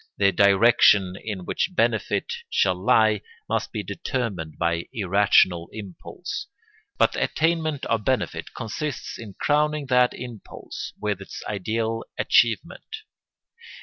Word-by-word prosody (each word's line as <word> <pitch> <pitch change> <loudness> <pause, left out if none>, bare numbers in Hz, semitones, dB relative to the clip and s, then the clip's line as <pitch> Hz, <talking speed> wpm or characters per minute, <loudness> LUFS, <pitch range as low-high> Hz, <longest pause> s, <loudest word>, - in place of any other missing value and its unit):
The 100 -1 +4
direction 100 -1 +5
in 100 -5 -5
which 185 - -2
benefit 470 - 0 0.2
shall 95 - +2
lie 105 +3 +3 0.3
must - - -1
be - - -3
determined 100 -12 -4
by 85 0 -1
irrational 95 -4 +3
impulse, 100 -5 -7 0.5
but - - +4
the - - -4
attainment 160 -3 0
of 115 -2 0
benefit 130 +2 -2
consists 125 +5 -5
in 105 -5 -9
crowning 150 0 +1
that 125 -1 +4
impulse 120 -4 -8
with 105 -2 -2
its 100 - -8
ideal 110 +3 -2
achievement. 120 - +2
110 Hz, 115 wpm, -24 LUFS, 95-125 Hz, 0.5 s, direction